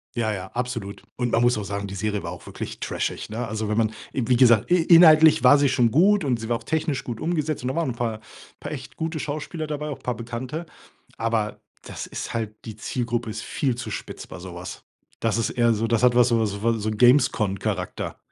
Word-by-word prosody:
Ja, 115 -2 0
ja, 95 -2 -6
absolut. 120 -5 -4
Und, 120 -1 -1
man 115 - +3
muss 120 +1 +3
auch 105 - -3
sagen, 100 +1 -4
die 100 - -7
Serie 105 0 -2
war - - -5
auch - - -11
wirklich - - -7
trashig, - - -3
ne? 115 +2 -3
Also, 110 0 -3
wenn 105 +1 0
man, 110 -1 +3 0.2
e 130 - -1
wie 125 0 +3
gesagt, 120 -2 +5
in 175 -2 +4
inhaltlich 160 -4 +7
war 130 +3 +8
sie 140 -1 +3
schon 120 -3 +3
gut 195 - +4
und 125 -4 +1
sie 115 +1 -6
war 120 - +2
auch 115 - -18
technisch 155 -1 -1
gut 120 -3 -6
umgesetzt 155 -2 -1
und 125 - -2
da 130 - -2
waren 165 -5 0
‘n - - -4
paar, 115 -2 -3 0.4
paar - - -6
echt - - -8
gute 160 0 -3
Schauspieler 155 +2 -4
dabei, 150 0 -4
auch 145 - -4
‘n - - -23
paar 125 - -2
Bekannte, 120 +8 -5 0.5
aber 115 -2 -1 0.2
das - - -7
ist - - -6
halt 110 -2 -3
die 110 -2 -7
Zielgruppe 120 0 -3
ist 110 0 -5
viel 135 -4 -1
zu 120 0 -6
spitz - - -7
bei - - -9
so 90 0 -9
was. 90 +1 -8 0.4
Das 115 0 0
ist 115 - 0
eher 120 -2 +3
so 110 +1 0
das 115 0 +1
hat 125 -1 +5
was 125 0 +5
so, 115 -2 +2
so 100 -1 -3
von 115 +1 +1
so 110 +1 -2
Games 125 +5 +5
Con 100 -2 -1
Charakter. 95 -4 -3
120 Hz, 245 wpm, -24 LUFS, 110-135 Hz, 0.5 s, war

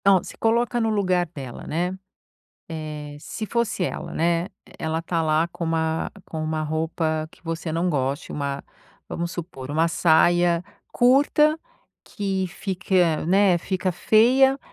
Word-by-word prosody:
Então, 195 -2 +5
se - - -9
coloca 235 +1 +1
no 225 - +1
lugar 185 -4 +1
dela, 135 -6 -8
né, 175 +4 -1 0.8
eh, 150 -2 -6
se 215 +8 -6
fosse 235 -4 -1
ela, - - -4
né, 170 +2 +1 0.3
ela 160 +1 -1
tá 165 0 -1
lá 155 +1 +2
com 170 - -5
uma 160 0 0 0.2
com 160 -1 -5
uma 155 0 -1
roupa 155 0 -1
que - - -21
você 165 -1 -4
não 170 +3 0
goste, 140 -1 -1
uma, 140 -1 -3 0.5
vamos 170 +1 -3
supor, 150 -6 -7
uma 160 +3 +2
saia 175 +1 +3 0.3
curta 290 +5 +4 0.5
que 195 -2 -2
fique, 190 0 -4 0.3
né, 190 0 +4
fica 185 +2 -1
feia, 250 +9 +4
170 Hz, 145 wpm, -24 LUFS, 160-195 Hz, 0.8 s, Então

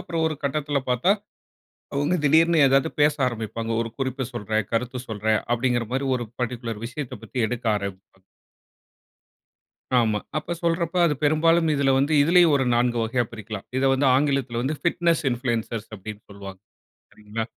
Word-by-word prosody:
அப்புறம் 165 -1 -2
ஒரு 155 - -4
கட்டத்துல 145 0 0
பாத்தா 125 +10 +3 0.8
அவங்க 145 +5 +1
திடீர்னு 165 +3 +4
ஏதாது 135 +3 +3
பேச 150 +1 +5
ஆரம்பிப்பாங்க. 115 -1 -4
ஒரு 115 - -6
குறிப்பு 130 -1 -2
சொல்றன், 110 -3 -2
கருத்து 125 +2 -1
சொல்றன் 110 0 0
அப்டிங்கிற 120 -1 0
மாரி 135 +1 -1
ஒரு 120 -1 -5
பர்ட்டிகுலர் 120 -3 -4
விஷயத்த 130 +2 -6
பத்தி 130 - -7
எடுக்க 120 +1 -5
ஆரம்பிப்பாங்க. 95 -1 -8 1.7
ஆமா. 110 -3 +2 0.2
அப்ப 165 +3 -4
சொல்ற 170 0 +1
அப்ப 170 - -9
அது 150 - +1
பெரும்பாலும் 165 +2 +3
இதுல 140 -1 +2
வந்து 140 +3 +1
இதுலயும் 170 0 +5
ஒரு 135 - +1
4 120 0 +1
வகையா 120 +2 0
பிரிக்கலாம். 105 -2 -7
இத 130 - +1
வந்து 135 +1 +2
ஆங்கிலத்துல 135 -3 +1
வந்து 140 +5 -1
பிட்னஸ் 170 -1 +2
இன்ஃப்ளூயன்சர்ஸ் 115 -2 -2
அப்டின்னு 105 +1 -9
சொல்லுவாங்க. 100 -1 -10 0.5
சரிங்களா, 105 +1 -5
125 Hz, 150 wpm, -24 LUFS, 115-145 Hz, 1.7 s, பேச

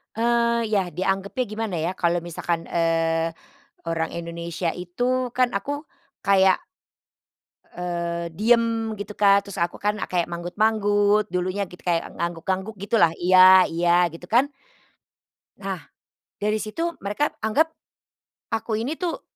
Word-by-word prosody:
Eee, 235 0 +2
yah 195 -4 +2
dianggapnya 195 +7 -1
gimana 215 -3 -3
ya 165 +2 -1
kalau 170 0 +1
misalkan, 170 0 -3
eee, 165 0 +1 0.5
orang 165 -1 -1
Indonesia 170 0 -3
itu 245 +8 -1
kan 255 -1 +3
aku 285 +9 -3 0.4
kayak, 190 -2 +5 1.2
eee, 170 -1 -3
diem 225 +2 +2
gitu 205 +1 -6
Kak. 200 -1 +4
Terus 200 - -6
aku 170 +1 -1
kan 210 +1 -1
kayak 175 -2 +1
manggut-manggut, 205 +3 +1
dulunya 185 +3 -1
gitu 180 - -14
kayak 170 -2 0
ngangguk-ngangguk 185 +5 -3
gitulah, 200 -5 +3
"Iya, 185 +1 +7
iya," 175 +1 +3
gitu 170 +1 -10
kan. 265 +6 +3 1.1
Nah, 195 -3 -5 0.6
dari 210 +1 +1
situ 330 +12 -2
mereka 210 +10 -1
anggap 290 +10 +2 0.8
aku 225 0 -2
ini 285 +7 -3
tuh 355 -2 -3
195 Hz, 125 wpm, -24 LUFS, 170-220 Hz, 1.2 s, Iya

